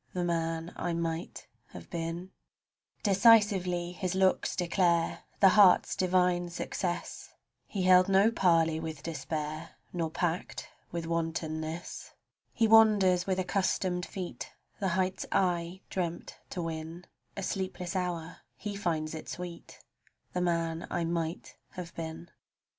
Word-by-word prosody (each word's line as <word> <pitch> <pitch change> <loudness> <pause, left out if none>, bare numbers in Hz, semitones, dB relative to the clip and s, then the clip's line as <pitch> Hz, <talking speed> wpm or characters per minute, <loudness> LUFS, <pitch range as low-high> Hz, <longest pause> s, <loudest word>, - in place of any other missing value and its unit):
90 - - -1
THE 175 -1 +1
MAN 165 0 -2
I 175 - -2
MIGHT 165 0 -3 0.3
HAVE - - -11
BEEN 170 +2 -4 0.7
Decisively 195 -4 +4
his 185 0 -3
looks 190 0 +2
declare 170 -1 +1 0.2
The 195 - +9
heart's 195 -2 +6
divine 180 -1 +2
success; 175 0 -4 0.3
He 195 -3 -2
held 185 0 +6
no 195 +3 +5
parley 165 -6 +3
with 160 -3 -6
despair, 155 -1 -4 0.2
Nor 165 -2 -1
pact 170 +2 -2 0.2
with 170 -1 -3
wantonness; 165 0 -3 0.4
He 225 - +2
wanders 205 -5 +5
with 190 -1 +1
accustomed 185 -1 0
feet 185 -3 -6 0.3
The 195 - 0
heights 185 0 -1
I 175 0 0
dreamt 175 -2 -4
to 180 - -4
win; 165 +1 -5 0.3
A 195 - -3
sleepless 185 -1 -3
hour, 175 -3 -2 0.2
he 205 -1 -5
finds 165 -6 -1
it 160 - -7
sweet 175 -1 -8 0.5
The 180 - -1
man 165 -1 -1
I 175 - -1
might 165 0 -3 0.2
have 175 -2 -7
been. 160 +1 -7
175 Hz, 130 wpm, -30 LUFS, 165-185 Hz, 0.7 s, The